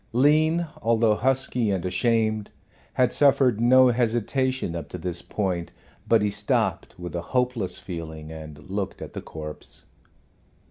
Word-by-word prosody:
Lean, 155 +6 +3 0.2
although 115 -1 +3
husky 125 0 +1
and 95 -3 -1
ashamed, 110 +1 +1 0.4
had 125 -1 +2
suffered 130 -5 +4
no 130 +2 +6
hesitation 120 -2 0
up 85 - -6
to - - -6
this 85 0 -5
point, 90 -5 -3 0.4
but 110 -1 +4
he 105 - +2
stopped 105 +1 -1
with 90 0 -7
a 85 - -2 0.2
hopeless 125 -6 0
feeling 80 -3 -7
and 75 -2 -10
looked 100 0 -3
at - - -8
the - - -5
corpse. 75 -1 -9
110 Hz, 140 wpm, -25 LUFS, 90-125 Hz, 0.4 s, no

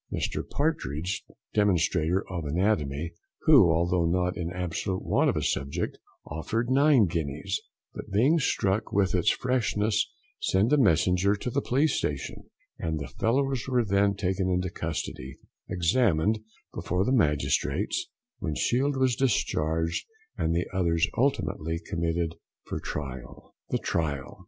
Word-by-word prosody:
Mr - - -2
Partridge, 90 - -1 0.3
demonstrator 90 -3 +2
of 90 -3 -4
anatomy, 80 -2 0 0.3
who, 85 - +7
although 85 +1 +2
not 90 +1 +1
in 85 -1 -3
absolute 90 +1 -3
want - - +3
of - - 0
a - - -1
subject, 70 +1 -2 0.3
offered 115 +11 -2
nine 140 -4 +5
guineas, 80 +3 -2 0.3
but - - -8
being 130 +12 +3
struck 105 -6 0
with 95 -3 +2
its 90 -2 +3
freshness 110 -4 +1 0.3
sent 110 - +2
a - - +6
messenger 90 - +3
to 115 +5 -4
the 140 - 0
police 140 +6 +2
station, 70 -3 -3 0.3
and 80 -1 -2
the 70 -3 -5
fellows 135 +2 +1
were 125 -3 +2
then 100 0 +2
taken 95 -1 -1
into 90 0 0
custody, 75 -6 -5 0.3
examined 95 +2 +2 0.3
before 90 +3 -1
the 125 - +1
magistrates, 75 - +1 0.3
when 75 - -3
Shield 135 - +1
was 130 -2 +2
discharged 80 - 0 0.3
and 80 +1 0
the 85 - +1
others 85 -1 +2
ultimately 85 - 0
committed 85 0 -2 0.3
for - - -4
trial. 65 -3 -7 0.2
THE - - +1
TRIAL. 70 -4 -2
90 Hz, 135 wpm, -27 LUFS, 80-110 Hz, 0.3 s, who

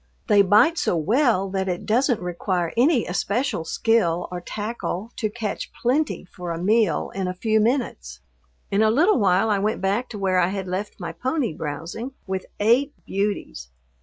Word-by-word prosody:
They 205 -2 +5
bite 215 - +4
so 180 - +1
well 215 - +2
that 190 0 -1
it 175 -1 -3
doesn't 245 +1 +2
require 180 -1 -2
any 250 +1 +3
especial 200 - -1
skill 180 -3 +1
or 180 -1 -5
tackle 215 +1 -4
to 215 - -1
catch 215 -1 -4
plenty 270 -1 0
for 180 -1 -8
a 165 - -3
meal 210 +2 +1
in 190 -1 -2
a 180 - -3
few 220 +3 +1
minutes. 215 - -1 0.5
In 200 - +2
a 220 - +5
little 310 - +4
while 195 +2 +3
I 200 - +2
went 215 +3 0
back 200 +6 0
to 215 - -7
where 190 -2 +1
I 175 - +3
had 190 0 -3
left 190 +4 -4
my 170 -3 -4
pony 255 - -1
browsing, 165 - -5
with 190 -1 -4
eight 245 +7 +3
beauties. 195 - -3
205 Hz, 175 wpm, -23 LUFS, 180-235 Hz, 0.5 s, They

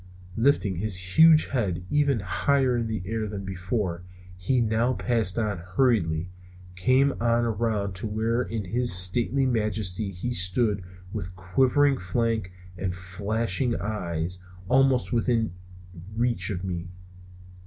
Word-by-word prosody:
Lifting 115 - +2
his 100 0 0 0.2
huge 160 -1 +7
head 95 -9 -2
even 140 -6 +2
higher 130 +7 +1
in 115 -1 -1
the 110 -5 -3
air 110 +2 -2
than 100 -2 -6
before, 90 -1 -3 0.3
he 95 +8 0
now 115 +2 +1
passed 115 -7 0
on 105 -5 -1
hurriedly, 90 -3 0 0.4
came 130 +9 +3
on 120 0 +2
around 110 -3 -1
to 105 - -3
where 110 +3 0
in 115 -4 -4
his 120 +6 +1
stately 105 +9 +3
majesty 110 -4 0
he 95 +6 -4
stood 100 +1 +1 0.3
with 90 -4 -5
quivering 130 +10 +2
flank 110 +1 -1 0.3
and 90 -1 -2
flashing 105 +5 -1
eye 90 -5 -3 0.4
almost 130 0 +3
within 115 -4 +1 0.6
reach 115 -6 +1
of 90 -3 -4
me. 90 -2 -4
110 Hz, 130 wpm, -26 LUFS, 90-120 Hz, 0.6 s, huge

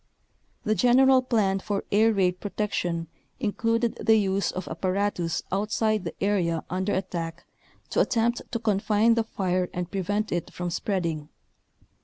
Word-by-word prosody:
The 215 - +2
general 255 +3 +5
plan 210 -6 +1
for 200 +1 -2
air 220 +2 +5
raid 185 -3 +1
protection 180 -5 -2 0.3
included 230 0 0
the 220 - +5
use 195 -2 +1
of 185 0 -5
apparatus 185 0 -1
outside 215 +1 0
the 165 - -5
area 175 -5 +1
under 190 +2 -1
attack 170 -3 -4 0.5
to - - +1
attempt 235 0 +1
to 235 - 0
confine 215 +1 +2
the 230 0 +1
fire 185 -4 -1
and 180 0 -4
prevent 205 +2 -1
it 175 - -2
from 175 -1 -4
spreading. 170 -5 -2
200 Hz, 140 wpm, -26 LUFS, 180-220 Hz, 0.5 s, general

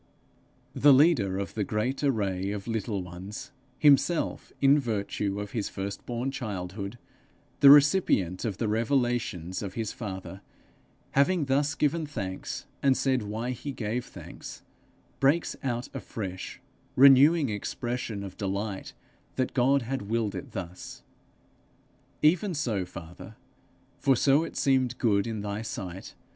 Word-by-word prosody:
The 145 -1 +6
leader 130 - +4
of 100 0 -4
the 105 - -1
great 110 +8 -2
array 100 -8 0
of 100 0 -5
little 110 -4 -2
ones, 90 +4 -8 0.3
himself, 150 +3 +3
in 140 +1 +5
virtue 100 -4 -2
of 105 -1 -5
his 110 -4 -2
firstborn 115 +6 -4
childhood, 100 -3 -5 0.6
the 140 - +7
first 140 - +12
recipient 140 - +2
of 105 -5 -2
the 115 - -1
revelations 115 - 0
of 100 -2 -6
his 115 -3 -2
father, 95 -4 -7 0.7
having 150 +3 +3
thus 140 +2 +1
given 150 +2 0
thanks, 95 -10 -5 0.2
and 135 -2 +3
said 130 -2 +1
why 110 +4 -3
he 140 +3 -5
gave 120 0 -3
thanks, - - -10 0.6
breaks 145 +5 +2
out 120 -2 -2
afresh, 95 -4 -6 0.4
renewing 140 +3 +7
expression 110 0 -4
of 95 -2 -8
delight 100 0 -3 0.4
that 130 -1 -1
God 135 +1 +3
had 120 -4 -4
willed 115 -2 0
it 135 -5 -7
thus: 90 -1 -7 1.2
'Even 175 +4 +3
so, 115 -10 -1
father, 85 -1 -10 0.6
for 135 - +3
so 140 +5 +4
it 165 - -7
seemed 130 -3 +2
good 100 -3 +2
in 110 -2 -3
thy 100 +1 -3
sight!' 95 -3 -7
115 Hz, 135 wpm, -28 LUFS, 100-135 Hz, 1.2 s, first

